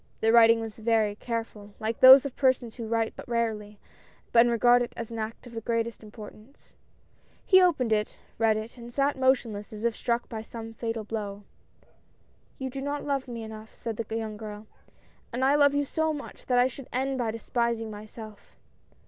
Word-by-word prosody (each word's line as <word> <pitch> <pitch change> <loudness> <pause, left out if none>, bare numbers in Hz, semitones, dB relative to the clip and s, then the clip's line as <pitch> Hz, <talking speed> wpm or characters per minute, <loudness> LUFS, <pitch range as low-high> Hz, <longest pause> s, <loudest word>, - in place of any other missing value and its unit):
The 225 - +3
writing 230 -1 +6
was 225 -1 -7
very 220 -2 +1
careful, 215 -2 -6
like 220 +1 -3
those 260 +1 +10
of 275 - -5
persons 255 -4 +1
who 230 -3 -7
write 225 0 -1
but - - -10
rarely, 220 -3 -2 0.6
and 235 +1 +6
regard 240 +1 +4
it 240 - -3
as 230 -1 -6
an 230 - -5
act 220 +3 -5
of 240 - -12
the 225 - -5
greatest 230 0 -2
importance. 215 +3 -14 0.7
He 375 -1 +6
opened 280 -11 +2
it, 210 0 -1 0.2
read 220 -1 +3
it, 220 +3 -7
and 235 0 -10
sat 280 +3 +1
motionless, 245 -5 0
as 215 +1 -6
if 235 -1 +1
struck 235 0 -1
by 220 -1 -6
some 225 0 -9
fatal 225 -1 -4
blow. 205 -2 -5 0.6
" - - -37
You 265 -1 -4
do 270 +1 -5
not 285 +1 -3
love 275 -2 -1
me 235 -2 -6
enough," 220 0 -10
said 230 -3 -5
the 225 -1 -4
young 220 -2 -5
girl, 210 0 -8 0.3
" - - -34
and 250 +2 0
I 275 - +4
love 285 -1 +4
you 285 0 +1
so 315 +2 0
much 295 - -9
that 250 - +2
I 245 - +5
should 260 0 -6
end 265 +1 -1
by 235 -2 0
despis 235 +1 -1
ing 225 -1 -6
myself. 215 0 -11
230 Hz, 200 wpm, -27 LUFS, 220-255 Hz, 0.7 s, those